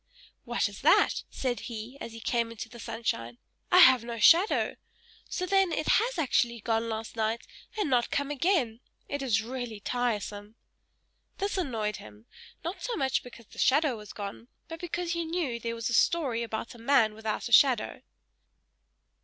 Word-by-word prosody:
"What - - 0
is - - -10
that?" - - +4
said 245 -4 -2
he, 230 +2 -7
as 230 - -6
he 230 - -9
came 235 +1 0
out 230 - -9
into 225 0 -7
the 235 +1 -12
sunshine. 120 - -3 0.3
"I 360 - +6
have 260 -8 +8
no 235 0 -5
shadow! 335 - +4 0.5
So 365 - -2
then, 385 -1 +3
it 310 - -2
has 475 +2 +3
actually 240 -6 +1
gone 225 +1 -1
last 220 +1 -5
night, 225 +1 -1 0.3
and 415 - 0
not 245 -3 +2
come 285 0 -1
again. 280 - +1 0.3
It 285 0 -3
is 225 -6 +1
really 240 -2 -5
tiresome!" 210 -2 -3 0.8
This 400 +1 -2
annoyed 225 - -2
him: 105 +1 -14 0.4
not 345 +4 -5
so 485 - -2
much 265 - 0
because 235 -2 -13
the - - -14
shadow 285 -1 +3
was 210 -1 -10
gone, 205 +3 -7 0.2
but 325 -1 -8
because 350 0 -3
he 340 0 -1
knew 320 -8 -2
there 230 0 -3
was 230 -1 -3
a - - -1
story 260 -4 +2
about 225 0 -4
a 240 - -14
man 230 -3 +3
without 220 +1 -3
a - - -10
shadow. 250 -1 +4
235 Hz, 180 wpm, -29 LUFS, 225-300 Hz, 0.8 s, have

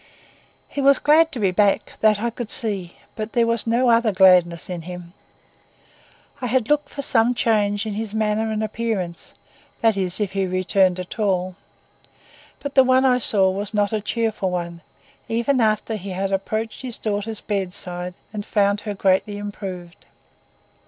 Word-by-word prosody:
He 285 - -4
was 275 0 +5
glad 320 +2 +4
to 260 - -6
be 195 -3 +2
back; 200 +2 +1
that 215 -1 +4
I 235 +2 -1
could 235 -1 -6
see, 195 -6 0 0.2
but 215 0 -5
there 235 -1 +3
was 230 0 0
no 240 +2 +3
other 230 -1 +3
gladness 180 -3 +4
in 180 -2 -5
him. 175 0 -9 1.3
I 250 - -2
had 245 -1 0
looked 295 -1 +1
for 280 - -6
some 240 -1 +2
change 205 -3 +1
in 215 - -3
his 215 0 -4
manner 220 0 0
and 215 0 -2
appearance,—that 215 0 -3
is, 185 -1 +1
if 205 -3 -1
he 195 -1 -1
returned 185 0 +1
at 180 +5 -7
all,—but 190 +7 -6
the 265 - +6
one 260 +1 +3
I 250 -1 +4
saw 195 -5 +3
was 205 +2 -4
not 205 0 +1
a 215 - 0
cheerful 220 -3 -1
one, 170 -1 -4 0.5
even 235 +3 +1
after 215 0 +1
he 200 -1 -7
had 190 +1 -2
approached 215 +3 -3
his 250 -3 -5
daughter's 210 0 -3
bedside 180 -3 -3 0.2
and 210 -1 -4
found 205 -1 +1
her 205 -1 -5
greatly 195 +2 +1
improved. 190 -4 -8
210 Hz, 165 wpm, -22 LUFS, 190-230 Hz, 1.3 s, the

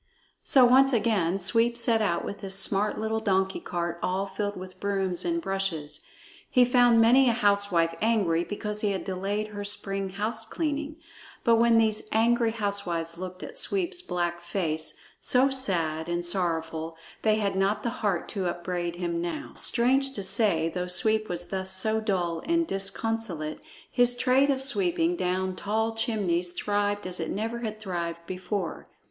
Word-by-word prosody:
So 260 -2 +6
once 265 +2 +5
again 205 -6 +1
Sweep 230 +5 +2
set 230 -1 +3
out 170 -5 0
with 200 - -6
his 195 -1 0
smart 205 +1 +3
little 220 0 -1
donkey 190 -3 0
cart 170 -1 -4
all 190 +2 -1
filled 205 0 -4
with 185 0 -10
brooms 195 -3 -1
and 335 -1 0
brushes. 185 - -3 0.5
He 250 -1 +5
found 245 -1 +4
many 245 +3 +5
a - - +2
housewife 200 -6 +2
angry 200 -7 +2
because 210 +2 -3
he 205 -2 +1
had 190 - -4
delayed 200 +3 -3
her 205 -1 -6
spring 195 -1 -1
house 215 +4 -2
cleaning; 300 +4 -3 0.5
but 230 -2 +4
when 230 0 +4
these 215 -1 +2
angry 230 +1 +3
housewives 200 -6 -3
looked 185 0 -7
at - - -2
Sweep's 370 -5 +3
black 175 - -2
face, 165 -3 -3 0.3
so 260 +2 +3
sad 170 -11 +1
and 175 0 -1
sorrowful, 165 -3 -1 0.2
they 215 -1 +3
had 205 -3 -1
not 195 +2 0
the 235 - -1
heart 200 -6 0
to 190 -3 -2
upbraid 175 0 -3
him. 170 -1 -2
Now, 170 0 -5
strange 265 +3 +1
to 200 - -5
say, 190 -4 +1
though 180 +2 -3
Sweep 215 +3 +1
was 175 0 -3
thus 190 -1 -1
so 220 +3 +2
dull 175 -6 -1
and 335 0 +2
disconsolate, 195 - -2 0.3
his 245 -1 +3
trade 260 +3 +3
of 270 -1 0
sweeping 345 +3 0
down 185 - -1
tall 220 +3 -1
chimneys 190 -6 -1
thrived 205 +1 -1
as 180 0 -3
it 165 - -3
never 225 +3 -3
had 215 -2 -5
thrived 170 -4 -4
before. 185 0 -4
200 Hz, 165 wpm, -27 LUFS, 180-230 Hz, 0.5 s, So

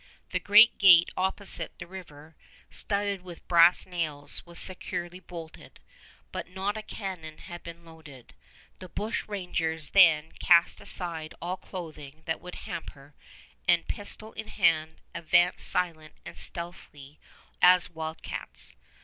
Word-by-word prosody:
The - - 0
great 210 +3 +6
gate 175 -4 +7
opposite 190 +2 0
the - - -8
river, 160 -4 -12 0.4
studded 200 -2 -2
with 180 -2 -12
brass 170 0 +5
nails, 155 -5 +1
was 170 -1 -6
securely 180 -1 -3
bolted, 170 -3 -11 0.5
but - - -6
not 190 +3 -3
a 215 - -5
cannon 185 -7 -7
had 175 0 -10
been 170 0 -11
loaded. 155 -6 -15 0.5
The 185 - -10
bushrangers 180 -7 -3
then 160 -5 +5
cast 170 -1 +4
aside 165 -3 -2
all 175 +2 -3
clothing 160 -5 -10
that 160 - -3
would 180 0 -9
hamper, 145 -4 -9 0.5
and, 175 -1 +3
pistol 215 +2 -4
in 220 - -7
hand, 165 -6 +1
advanced 175 +2 +3
silent 165 -4 -1
and - - -9
stealthy 155 -4 -4 0.4
as 180 -1 +6
wild 160 -1 -7
cats. - - -1
170 Hz, 130 wpm, -27 LUFS, 160-185 Hz, 0.5 s, gate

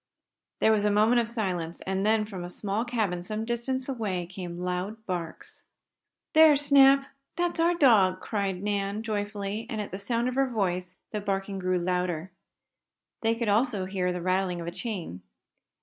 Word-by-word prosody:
There 220 - +5
was 210 -2 +2
a 210 - +3
moment 215 +4 +4
of 230 - -3
silence, 180 -8 -3
and 190 0 -2
then, 215 0 +3
from 190 -4 -7
a 175 - -6
small 200 +4 -2
cabin 215 -8 -1
some 215 +5 -4
distance 245 +2 -2
away, 210 -9 -2
came 175 -1 -7
loud 180 +5 -4
barks. 175 -3 -5 0.7
"There's 310 -2 +7
Snap! 275 -1 +6 0.3
That's 350 0 -1
our 340 +1 +3
dog!" 210 - +5
cried 195 -3 -2
Nan, 205 +1 -1
joyfully, 205 0 -3
and 220 -4 -3
at 210 - -4
the 190 - -5
sound 235 +3 -1
of 255 - -1
her 270 0 +1
voice 185 -5 -2 0.2
the 210 - -3
barking 195 -1 -2
grew 185 0 0
louder. 180 -1 -1 0.9
There 225 0 +2
could 230 -1 -2
also 210 -2 +2
be 190 +1 -6
heard 180 0 +1
the 175 - -4
rattling 185 -1 0
of 170 - -5
a 170 - -4
chain. 175 - -5
205 Hz, 180 wpm, -27 LUFS, 185-230 Hz, 0.9 s, There's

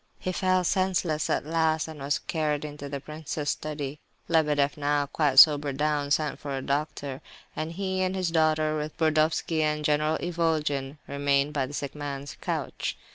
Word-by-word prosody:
He 185 - -3
fell 185 0 +2
senseless 180 -4 +1
at - - 0
last—and 160 -1 0
was 140 +1 0
carried 150 -2 -1
into 145 -1 -7
the 140 0 -4
prince's 150 0 -5
study. 150 -1 -5 0.3
Lebedeff, 150 -3 +2
now 145 0 +1
quite 145 -1 0
sobered 145 -2 +7
down, 150 -1 0
sent 150 +1 0
for 140 -2 -4
a - - -3
doctor; 140 -1 -2 0.3
and 155 +1 -3
he 190 +1 -2
and 185 0 0
his 185 -3 -1
daughter, 155 -1 +2
with 150 0 -4
Burdovsky 155 0 +2
and 150 0 0
General 150 +1 +2
Ivolgin, 155 -5 -1
remained 140 +1 +1
by 135 -3 0
the 145 - -10
sick 140 -1 -4
man's 140 -1 -6
couch. - - -3
150 Hz, 165 wpm, -27 LUFS, 145-160 Hz, 0.3 s, sobered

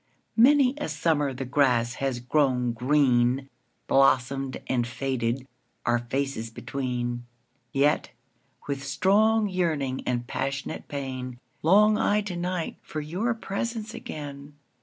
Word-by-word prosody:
Many 260 +2 +6
a 295 - -3
summer 150 -4 +1
the 130 +1 -5
grass 125 -3 +2
has 135 -3 0
grown 125 -1 +1
green, 130 +1 +2 0.4
Blossomed 135 0 +2
and 120 -2 0
faded, 125 0 -2 0.4
our 120 0 +3
faces 120 -1 -2
between:Yet, 120 +3 -2 0.6
with 140 -1 -3
strong 210 +9 +3
yearning 155 -8 -1
and 120 -1 0
passionate 140 +3 -3
pain, 130 -3 -5 0.2
Long 210 +6 +5
I 210 -1 +3
to 200 -3 -5
night 175 -1 -3
for 155 - -6
your 185 +11 -1
presence 225 +1 -4
again. 145 -1 -8
135 Hz, 115 wpm, -26 LUFS, 125-175 Hz, 0.6 s, Many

